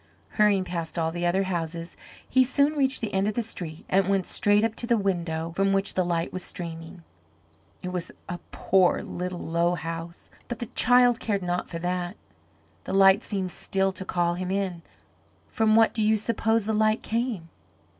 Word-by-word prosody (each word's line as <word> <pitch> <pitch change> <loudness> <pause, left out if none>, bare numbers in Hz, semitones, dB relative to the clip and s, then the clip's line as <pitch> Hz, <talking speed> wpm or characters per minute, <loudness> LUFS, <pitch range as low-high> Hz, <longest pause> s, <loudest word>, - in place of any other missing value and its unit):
Hurrying 210 -3 +3
past 170 -2 -5
all 160 -1 0
the 175 +1 -1
other 190 +3 +2
houses, 170 -2 -4 0.3
he 260 0 +4
soon 280 +4 +2
reached 270 -3 +1
the 220 -3 -3
end 195 +1 +1
of 210 - -1
the 235 - 0
street 170 -7 -6
and 195 0 +2
went 195 -2 +1
straight 205 +1 +2
up 225 -1 +1
to 235 - -3
the 235 -1 +3
window 170 -5 -2
from 195 +1 +2
which 195 0 +1
the 185 - +1
light 170 -1 -1
was 185 - -4
streaming. 165 -1 -6 0.8
It 180 - -3
was 180 -2 -4 0.2
a 175 - -5
poor, 185 -2 +2
little, 180 0 -5
low 170 +2 +1
house, 165 +1 -7 0.2
but 240 - -4
the 240 - -4
child 245 0 +5
cared 200 -4 -1
not 175 0 -2
for 165 - -5
that. 180 +2 -3 0.7
The - - -4
light 195 +1 +6
seemed 190 -5 -3
still 195 +1 -1
to 190 0 -5
call 175 -2 0
him 180 +1 -4
in. 190 -3 -2 0.7
From 220 -1 +2
what 225 0 +5
do 220 - -2
you 215 +1 +4
suppose 225 0 0
the 220 - 0
light 215 +1 +2
came? 225 -7 -2
190 Hz, 190 wpm, -26 LUFS, 175-215 Hz, 0.8 s, light